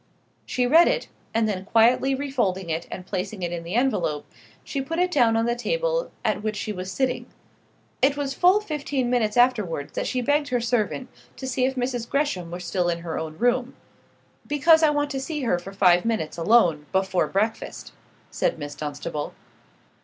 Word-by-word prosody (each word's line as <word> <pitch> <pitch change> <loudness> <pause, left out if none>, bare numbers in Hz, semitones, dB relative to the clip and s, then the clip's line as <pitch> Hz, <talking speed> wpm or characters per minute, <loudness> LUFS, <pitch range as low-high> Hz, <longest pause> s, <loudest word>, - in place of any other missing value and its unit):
She 250 - 0
read 325 +7 +6
it, - - 0 0.2
and 225 -1 +1
then 190 -3 -2
quietly 240 +6 +3
refolding 215 -11 -1
it 160 +1 -3
and 180 - -7
placing 195 +1 -4
it 175 - -2
in 170 -1 -4
the 170 +5 -5
envelope, 175 - 0 0.4
she 275 - -3
put 325 +5 -4
it 360 +1 +2
down 235 -7 +3
on 225 - +2
the 235 0 +1
table - - -1 0.2
at - - +1
which 215 0 -2
she 210 +1 -3
was 185 0 -5
sitting. 255 +4 -1 0.7
It 275 +2 +3
was 280 -2 -2
full 365 +8 +4
fifteen 285 -8 -2
minutes 225 -3 +1
afterwards 205 - +2
that - - -2
she 255 - -1
begged 290 +3 +2
her 250 -3 0
servant 220 - -1 0.3
to 265 - -6
see 260 0 0
if 265 +1 -1
Mrs. 245 -2 -2
Gresham 275 - -1
were 175 +1 -6
still 180 0 -1
in 170 -1 -2
her 165 -1 -4
own 155 -1 -6
room. 245 +4 +1 0.7
"Because 315 +3 +5
I 315 - +5
want 290 -1 0
to 270 - -2
see 300 +2 -4
her 225 -9 +1
for 190 +3 -9
five 180 -3 +4
minutes, 220 -9 -1
alone, 170 -5 +3
before 190 -1 +1
breakfast," 215 +3 -2 0.4
said - - 0
Miss 145 -2 -6
Dunstable. 150 +1 -5
230 Hz, 190 wpm, -24 LUFS, 180-270 Hz, 0.7 s, read